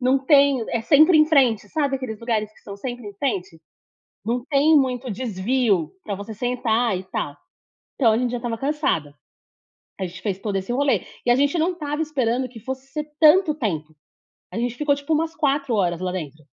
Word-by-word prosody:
não 260 +2 +3
tem 280 -5 +4
é 235 - 0
sempre 310 +6 +6
em 305 - +6
frente, 250 -9 +3
sabe 280 -1 0
aqueles 235 -5 -6
lugares 215 -3 -1
que - - -23
são 200 - -9
sempre 245 +1 -6
em 200 - -11
frente? 195 - -3 0.6
Não 240 +2 -1
tem 300 +2 +5
muito 255 -1 -1
desvio, 210 - 0
para 205 - -3
você 200 +3 -7
sentar 240 -2 0
e 185 - -8
tal, 190 - -4 0.6
então 230 -5 +4
a 220 - +2
gente 250 -1 0
já 245 - -1
estava 230 -1 -4
cansada. 270 - -1 0.9
A 190 - -1
gente 175 +1 -11
fez 195 -3 -2
todo 200 -2 -2
esse 190 +5 -3
rolê, 280 +2 +1 0.2
e 240 - +3
a 240 - +5
gente 285 +4 +2
não 335 +4 +2
estava 300 -2 -3
esperando 255 -4 -1
que 235 -2 -12
fosse 265 +3 -6
ser 300 +1 -4 0.2
tanto 315 +1 +6
tempo, 160 - -3 0.6
a - - -4
gente 245 0 -1
ficou 295 0 +2
tipo 285 +3 -2
umas 325 +1 -1
4 280 -4 0
horas 175 -4 +1
lá 185 -1 -2
dentro. 155 -4 -6
245 Hz, 200 wpm, -23 LUFS, 210-280 Hz, 0.9 s, sempre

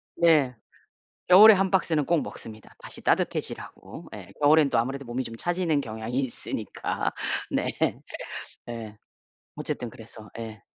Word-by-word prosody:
네. 155 -7 +4 0.7
겨울에 210 +5 +10
1 190 0 +1
박스는 160 -6 +1
꼭 170 -3 +2
먹습니다, 110 -1 -10
다시 - - -8
따뜻해지라고. - - -2
예 - - -11
겨울에는 150 -1 +5
또 120 - +2
아무래도 135 +3 -1
몸이 125 +2 -3
좀 115 0 -7
차지는 175 -1 0
경향이 110 +2 -4
있으니까. 130 -3 -3 0.4
네. - - 0 1.0
네. 110 -3 -7 0.6
어쨌든 120 - -3
그래서. 110 -1 -12
예. 110 -2 -7
130 Hz, 290 characters per minute, -26 LUFS, 115-165 Hz, 1.0 s, 겨울에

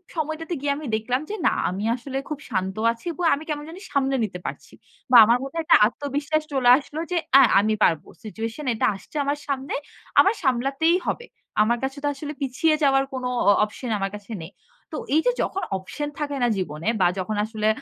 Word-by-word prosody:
সময়টাতে 315 +2 -3
গিয়ে 285 -1 0
আমি 305 - -7
দেখলাম 245 +5 -1
যে, 430 - -3
না - - +3 0.2
আমি 190 +3 -4
আসলে 265 +2 -6
খুব 300 -2 -4
শান্ত 190 -2 -2 0.2
আছি 230 +8 -11
এবং 355 - -5
আমি 300 - -8
কেমন 295 0 -3
জানি 355 +3 -9
সামলে 270 -1 +1
নিতে 180 -4 -4
পারছি - - -7 0.4
বা 245 - +9
আমার 235 +2 +4
মধ্যে 275 +5 -7
একটা - - +6
আত্মবিশ্বাস 290 +4 -2
চলে 255 -2 +3
আসলো 300 +2 -7
যে, 355 - +1 0.2
অ্যা 275 - +9 0.2
আমি 215 +1 +2
পারব। 160 -3 +3 0.2
সিচুয়েশন 225 +6 -5
এটা 220 - 0
আসছে 195 - -15
আমার 285 +1 -1
সামনে। 275 0 -3 0.5
আমার 395 +3 +6
সামলাতেই 275 +6 +2
হবে। 480 - -2 0.4
আমার 235 +3 +3
কাছে 270 +2 -3
তো - - +1
আসলে 295 +2 -6
পিছিয়ে 305 +4 +2
যাওয়ার 270 -1 +4
কোনো 255 -1 -3 0.2
অ - - +9
অপশন 230 +3 -5
আমার 195 0 -2
কাছে 205 +2 -11
নেই। 160 +4 -9 0.4
তো 310 - -4 0.2
এইযে 320 +11 +3
যখন 390 - -2
অপশন 290 +11 -5
থাকে 290 -1 -2
না - - +4
জীবনে 160 0 -4
বা 175 - +6
যখন 205 +3 -2
আসলে 215 -1 -2
270 Hz, 200 wpm, -24 LUFS, 220-300 Hz, 0.5 s, বা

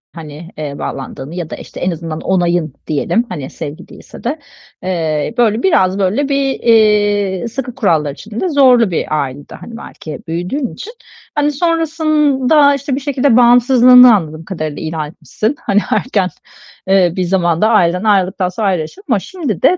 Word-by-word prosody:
hani, 160 +1 -10
eee, 145 -2 -5
bağlandığını 135 +3 -6
-ya 170 -3 -5
da, - - -5
işte, - - -11
en 180 - 0
azından 165 -1 -5
onayın 175 -5 0
diyelim, 195 - 0
hani, 135 -3 -6
sevgi 155 +5 -8
değilse - - -14
de 290 +6 -2 0.4
eee, 165 0 -2
böyle, 230 -1 +2
biraz, 190 - +2
böyle, 220 +10 0
bir, 275 -1 0
eee, 205 -3 +2
sıkı 250 0 -6
kurallar 160 - +1
içinde 220 - -5
zorlu 255 - +4
bir 155 -2 -1
ailede, 140 +2 -9
hani, 230 - -10
belki 155 -8 -9
büyüdüğün 180 - -3
içini, 455 - -9 0.4
hani, 295 0 +1
sonrasında, 305 -3 +2
işte, 275 -1 -3
bir 275 - -3
şekilde 275 -3 +1
bağımsızlığını 245 0 +7
anladığım 160 -3 -4
kadarıyla 155 -5 -5
ilan 155 -1 -3
etmişsin. 215 - -3
Hani, 205 -1 +2
erken, 205 -4 0 0.6
eee, 190 -3 +3
bir 185 - -1
zamanda 175 +2 +1
ailenden 180 -4 +2
ayrıldıktan 190 -2 +1
sonra 205 +3 -2
ayrı 185 -4 +1
yaşıyordun 255 - -5
ama 205 - +2
şimdi 270 - -5
de 365 - +4
205 Hz, 160 wpm, -15 LUFS, 170-255 Hz, 0.6 s, bağımsızlığını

